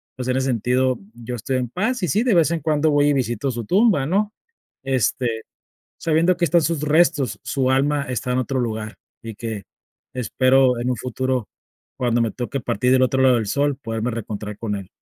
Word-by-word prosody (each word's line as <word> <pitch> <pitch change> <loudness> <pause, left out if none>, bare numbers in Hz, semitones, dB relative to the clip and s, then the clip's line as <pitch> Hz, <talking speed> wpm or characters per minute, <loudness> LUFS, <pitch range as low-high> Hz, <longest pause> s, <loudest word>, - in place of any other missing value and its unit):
pues, 125 -1 -5
en 130 0 +1
ese 135 0 0
sentido 125 +1 +1
yo 120 +1 -6
estoy 130 +3 -2
en 125 -2 -2
paz. 220 - -1
Y 180 - +2
sí, 215 +7 +1
de 245 -5 +2
vez 165 -1 +4
en 170 - 0
cuando 155 +1 +2
voy 145 0 +3
y - - +3
visito 125 -1 -1
su 120 -2 -5
tumba, 190 - +3
¿no?, 205 +6 0 0.5
este, 125 -2 0 0.6
sabiendo 165 +3 +2
que 175 - +2
están 170 0 +3
sus 160 -2 -1
restos, 150 -3 +2
su 135 -1 0
alma 140 +2 +2
está 125 +1 -2
en 125 - +1
otro 130 +1 -1
lugar, 110 -2 -3 0.3
y 115 -2 -8
que 110 -3 -5 0.5
espero, 130 +1 +3
en 125 - -1
un 125 - -1
futuro, 130 -1 -2 0.5
cuando 120 -2 +1
me 115 -3 0
toque 130 +4 -4
partir 125 +1 0
del 130 0 +4
otro 130 +1 +1
lado 130 -2 +5
del 110 -2 0
sol, 140 +4 0
poderme 115 -1 -3
reencontrar 105 -2 -5
con 105 -3 -3
él. 100 -2 -7
130 Hz, 205 wpm, -22 LUFS, 120-145 Hz, 0.6 s, lado